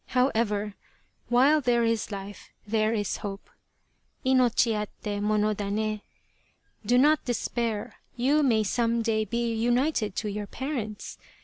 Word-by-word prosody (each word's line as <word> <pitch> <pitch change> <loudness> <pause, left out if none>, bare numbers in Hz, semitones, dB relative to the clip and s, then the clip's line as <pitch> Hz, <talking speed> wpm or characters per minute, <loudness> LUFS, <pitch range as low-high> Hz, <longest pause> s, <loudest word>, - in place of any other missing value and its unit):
However, 215 -5 +1 0.3
' - - -42
while 275 +6 +5
there 240 -2 +2
is 230 -2 0
life 200 0 -8 0.2
there 215 +1 +1
is 205 -3 -1
hope 200 -1 -7 0.4
' - - -41
[inochi 250 -3 +3
atte 210 -1 -4
monodanc]. 210 0 0 0.8
Do 245 +4 +3
not 300 +4 +4
despair, 235 -3 -2 0.2
you 270 +5 +2
may 230 -6 +3
some 230 +2 0
day 220 -1 +1
be 235 +2 -1
united 240 -2 +1
to 215 - -2
your 205 0 -4
parents. 240 -7 -5
225 Hz, 130 wpm, -27 LUFS, 210-245 Hz, 0.8 s, while